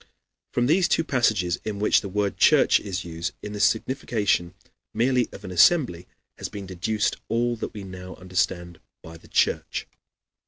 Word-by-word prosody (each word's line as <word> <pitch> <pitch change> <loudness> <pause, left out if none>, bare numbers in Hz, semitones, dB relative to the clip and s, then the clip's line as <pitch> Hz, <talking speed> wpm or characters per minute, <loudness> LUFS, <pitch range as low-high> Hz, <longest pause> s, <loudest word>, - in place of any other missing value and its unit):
From 120 - +1
these 170 +7 +3
two 165 - +2
passages 110 - +1
in 105 -2 -4
which 105 +1 +3
the 100 - -6
word 100 +1 -1
church - - +5
is 95 -3 -5
used, 85 0 -4
in 105 - -6
the 105 - -5
signification 105 -6 0 0.4
merely 125 0 +2
of 100 - -11
an 95 - -7
assembly, 90 - +3 0.3
has - - -4
been 100 -2 -7
deduced 95 +4 -1
all 120 +1 0
that 110 - -6
we 105 - -6
now 95 -1 -9
understand 90 -2 -2 0.2
by 80 0 -10
the - - -19
Church. - - 0
100 Hz, 165 wpm, -25 LUFS, 90-115 Hz, 0.4 s, church